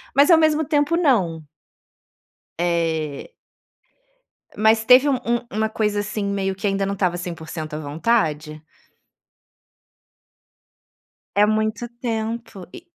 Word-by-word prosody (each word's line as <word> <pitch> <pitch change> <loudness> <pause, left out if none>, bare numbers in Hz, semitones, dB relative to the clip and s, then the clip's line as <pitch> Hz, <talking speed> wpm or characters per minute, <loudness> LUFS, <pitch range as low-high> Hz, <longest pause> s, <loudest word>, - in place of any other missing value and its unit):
Mas 285 +5 +5
ao 330 - +8
mesmo 315 -1 +2
tempo 300 +2 +1
não. 195 - +1 1.2
Eh. 165 -4 -1 1.3
Mas 220 +1 +3
teve 255 +4 +6
um 275 - +2
um 235 0 0
uma 220 +1 -1
coisa 210 -1 -1
assim 210 0 -4
meio 195 -1 -2
que 200 +2 -3
ainda 195 0 0
não 200 - -2
estava 180 -3 -1
100% 160 -3 -7
a 155 - -4
vontade? 155 -1 -1 2.7
É 205 - +5
muito 215 +2 -1
tempo, 225 -4 -4
e 345 - -11
205 Hz, 115 wpm, -21 LUFS, 170-235 Hz, 2.7 s, ao